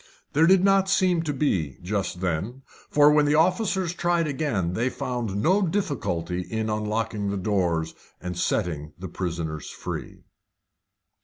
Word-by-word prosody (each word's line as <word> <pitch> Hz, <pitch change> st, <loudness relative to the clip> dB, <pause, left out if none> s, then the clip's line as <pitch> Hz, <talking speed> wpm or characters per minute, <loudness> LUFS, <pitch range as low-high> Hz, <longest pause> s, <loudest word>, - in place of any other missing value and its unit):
There 160 Hz, +3 st, +5 dB
did 190 Hz, 0 st, +5 dB
not 195 Hz, -1 st, +4 dB
seem 185 Hz, -3 st, +3 dB
to 155 Hz, -2 st, -2 dB
be, 95 Hz, -, 0 dB
just 95 Hz, -1 st, -2 dB
then. 95 Hz, +9 st, -2 dB, 0.3 s
For 145 Hz, 0 st, +6 dB
when 150 Hz, 0 st, +4 dB
the 145 Hz, +1 st, +3 dB
officers 180 Hz, +1 st, +2 dB
tried 175 Hz, -1 st, +1 dB
again 130 Hz, -, -1 dB
they 120 Hz, +6 st, 0 dB
found 125 Hz, -6 st, -3 dB
no 190 Hz, +4 st, +4 dB
difficulty 140 Hz, -, -1 dB
in 110 Hz, +3 st, -3 dB
unlocking 105 Hz, -1 st, -1 dB
the 100 Hz, -, -2 dB
doors, 90 Hz, -5 st, 0 dB, 0.3 s
and 90 Hz, 0 st, -5 dB
setting 80 Hz, -5 st, -1 dB
the 95 Hz, +2 st, -6 dB
prisoners 85 Hz, -3 st, -4 dB
free. -, -, -7 dB
115 Hz, 145 wpm, -25 LUFS, -, 0.3 s, For